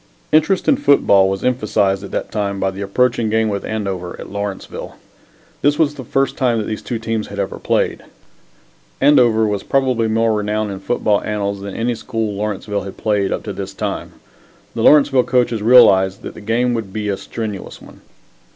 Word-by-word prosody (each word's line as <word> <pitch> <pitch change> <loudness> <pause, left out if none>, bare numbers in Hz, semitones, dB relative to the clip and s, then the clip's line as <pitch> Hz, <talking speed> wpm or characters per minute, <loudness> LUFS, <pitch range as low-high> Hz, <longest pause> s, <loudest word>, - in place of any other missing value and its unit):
Interest 160 +5 +2
in 275 - +4
football 100 - +4
was 95 0 -3
emphasized 105 -5 +1
at 100 - -7
that - - -4
time 100 -2 -2
by 95 - 0
the 95 +1 -8
approaching 115 +3 +1
game 110 0 +1
with 100 -1 -3
Andover 95 -5 -4
at - - -9
Lawrenceville. 100 -1 -6 0.7
This 145 +1 +2
was 150 -3 +2
the 140 -3 -8
first 135 +3 0
time 125 -4 +1
that 110 - -1
these 110 +1 -4
two 120 - -4
teams 115 -1 -3
had - - -9
ever - - -3
played. - - 0 1.0
Andover 125 -6 +4
was 105 -2 -1
probably 130 -3 +1
more 110 0 +1
renowned 105 0 -1
in 95 - -6
football 105 0 0
annals 100 -1 -3
than 100 -1 -7
any 120 +2 0
school 110 -2 -3
Lawrenceville 105 0 -3
had 95 0 -9
played 105 -3 0
up - - -2
to 105 - -5
this 95 0 -7
time. - - -4 0.6
The - - -3
Lawrenceville 140 -4 +5
coaches 120 -3 +1
realized 100 -5 +5
that - - -7
the - - -11
game 120 +4 0
would 110 -5 -4
be 105 +1 -4
a 100 - 0
strenuous 105 -2 -6
one. - - -16
110 Hz, 190 wpm, -18 LUFS, 100-120 Hz, 1.0 s, Lawrenceville